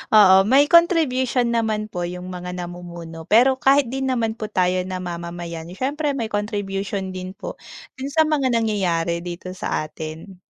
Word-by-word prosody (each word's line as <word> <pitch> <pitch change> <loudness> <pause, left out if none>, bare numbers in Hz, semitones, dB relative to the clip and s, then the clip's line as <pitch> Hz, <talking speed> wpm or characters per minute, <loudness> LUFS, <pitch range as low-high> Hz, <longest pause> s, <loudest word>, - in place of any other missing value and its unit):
Oo 190 -2 +8
may 275 +4 +6
contribution 265 -8 +4
naman 215 -2 0
po 175 - -4
yung 180 +1 -7
mga 180 0 -6
namumuno, 175 -2 -8
pero 260 +4 +5
kahit 270 -2 +4
din 265 0 -2
naman 230 -3 0
po 215 - -3
tayo 185 -2 +1
namamayan 170 -2 -5
syempre 285 +3 -1
may 230 -4 -3
contribution 200 -2 -3
din 185 0 -6
po - - -6 0.5
dun 270 +2 -3
sa 315 +2 +4
mga 290 -4 +1
nangyayari 180 -7 0
dito 175 +1 -6
sa 180 - -2
atin. 160 +5 -8
195 Hz, 155 wpm, -22 LUFS, 175-255 Hz, 0.5 s, Oo